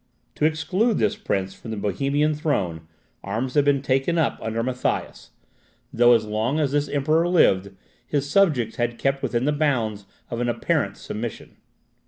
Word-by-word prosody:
To 150 - 0
exclude 185 +8 +1
this 105 -2 +1
prince 95 -1 -2
from 115 - -11
the 110 - -4
Bohemian 140 +10 0
throne, 90 - -2 0.4
arms 115 +6 -3
had 145 -1 +3
before 145 - +5
been 135 - -3
taken 135 +5 +1
up 160 - +1
under 115 +1 -2
Matthias, 125 0 -3 0.6
though 120 +1 +6
as 115 -2 +2
long 110 +7 -1
as 145 -3 +1
this 145 0 0
Emperor 155 +4 +2
lived, 100 - +3 0.4
his 145 -1 -1
subjects 140 - +2
had 120 -1 -1
kept 135 0 0
within 120 +1 -1
the 150 - +2
bounds 120 -9 -1 0.2
of 120 0 -2
an 120 - 0
apparent 120 - -1
submission. - - -6
130 Hz, 170 wpm, -23 LUFS, 110-150 Hz, 0.6 s, though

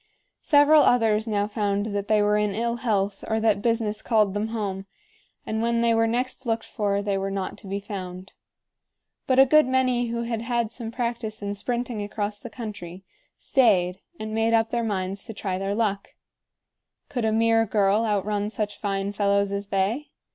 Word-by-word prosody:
Several 295 +1 +6
others 225 -4 +3
now 205 -2 +1
found 205 -1 -1
that 200 0 -2
they 210 -1 +3
were 210 0 +3
in 210 -2 0
ill 235 +1 -1
health 205 -4 -1
or 220 0 0
that 215 -2 +2
business 225 -2 0
called 215 -4 +2
them 205 +2 -1
home; 200 -4 -4 0.6
and 220 0 -2
when 235 0 +1
they 235 0 +3
were 225 0 +3
next 250 +3 -2
looked 225 -1 0
for, 200 -1 -1
they 200 -1 0
were 195 0 -2
not 195 -1 -3
to 205 - -12
be 200 +1 -2
found. 190 -2 -7 0.9
But 260 - +2
a 270 - +8
good 305 +1 +5
many 255 -2 +1
who 235 0 -2
had 230 -1 -3
had 235 -1 -1
some 235 -2 -6
practice 235 -3 -4
in 200 0 -2
sprinting 235 +1 -3
across 205 0 -3
the - - -8
country 195 -6 -8 0.3
stayed 190 -8 +2 0.2
and 215 0 -5
made 225 +1 +1
up 225 0 +3
their 235 -1 0
minds 195 -2 -2
to 225 - -8
try 190 -2 -3
their 195 +1 -2
luck. 205 -3 -2 0.9
Could 245 -3 -3
a 220 - +2
mere 225 0 +3
girl 205 +1 +2
outrun 205 -1 0
such 210 -1 -4
fine 195 -1 -2
fellows 200 -1 +1
as 200 0 -3
they? 200 +10 -1
215 Hz, 185 wpm, -25 LUFS, 200-230 Hz, 0.9 s, a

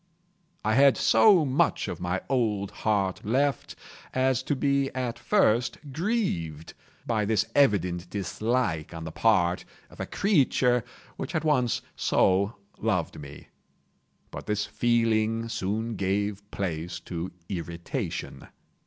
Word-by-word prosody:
I 110 - +2
had 135 +2 +6
so 195 -8 +5
much 145 +5 +1
of 85 - -5
my 90 +1 -1
old 110 -7 0
heart 100 -4 -1
left, 135 +6 0 0.4
as 130 -1 +2
to 145 - -1
be 140 0 +1
at 125 -2 -3
first 125 - +2 0.2
grieved 145 - -2 0.3
by 110 -3 0
this 105 0 +1
evident 90 -10 +2
dislike 100 -4 -1
on 80 - -6
the 80 - -6
part 90 -3 +2 0.3
of - - -16
a - - -3
creature 130 - +2 0.3
which - - -5
had 160 - 0
once 130 -7 +1
so 100 +4 +2 0.2
loved 90 -10 -1
me. 70 0 -11 0.8
But - - -8
this 105 -1 0
feeling 115 -1 +1
soon 110 +1 -2
gave 100 +1 -1
place 85 -3 -3
to 85 +1 -5 0.2
irritation. 85 -3 -5
110 Hz, 125 wpm, -27 LUFS, 95-130 Hz, 0.8 s, had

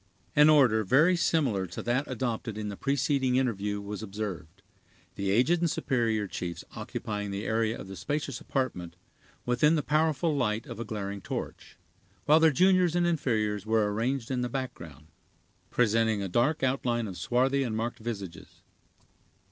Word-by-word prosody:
An 150 +1 +7
order 125 -8 +5
very 150 - +4
similar 135 - +1
to 85 - -7
that 125 +4 0
adopted 115 -3 -3
in 105 -1 -3
the 100 - -5
preceding 135 0 +1
interview 105 -6 0
was 100 0 -6
observed; 95 -4 -6 0.5
the 100 0 -3
aged 130 - +3
and 170 0 +1
superior 115 -7 0
chiefs 90 -2 -5
occupying 105 -1 -4
the 100 +2 -4
area 110 0 0
of - - -8
the 95 - -8
spacious 140 - -3
apartment, 115 -11 -3 0.5
within 125 +6 +3
the 150 - 0
powerful 155 0 +1
light 115 -3 0
of 115 -5 -8
a - - -2
glaring 100 -2 -5
torch, - - -6 0.5
while 155 +2 +6
their 160 0 +6
juniors 180 +3 +3
and 175 0 +2
inferiors 110 - 0
were 110 -2 +2
arranged 120 +3 -1
in 125 -1 0
the 125 - -2
background, 85 - -6 0.6
presenting 110 -3 +2
a - - -2
dark 125 - +1
outline 120 -3 0
of 95 - -7
swarthy 130 +7 +1
and 115 -5 -2
marked 115 +2 -3
visages. 100 -7 -7
115 Hz, 160 wpm, -28 LUFS, 105-140 Hz, 0.6 s, An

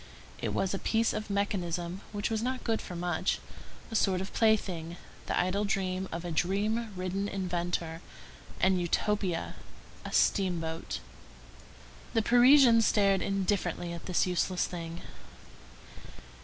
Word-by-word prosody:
it - - -1
was 190 - 0
a 195 - -2
piece 225 0 +1
of 215 0 -4
mechanism 185 -3 -2
which 205 +1 -2
was 220 -1 0
not 255 +2 -2
good 225 -2 0
for 180 - -7
much; 175 +1 0 0.5
a - - -4
sort 190 -4 +2
of 190 - -6
plaything, 180 -7 +1 0.3
the - - 0
idle 185 +3 +1
dream 190 -2 -1
of 170 +1 -5
a 175 - -3
dream 210 +7 0
ridden 185 +2 -2
inventor; 175 -3 -2 0.6
an 190 0 +3
utopia—a 180 0 -3
steamboat. 165 -4 0 1.1
The 225 - +3
Parisians 245 0 +7
stared 195 -2 +3
indifferently 185 -3 -1
at 170 - -8
this 180 - +2
useless 180 0 0
thing. 170 -1 -6
190 Hz, 130 wpm, -30 LUFS, 175-210 Hz, 1.1 s, Parisians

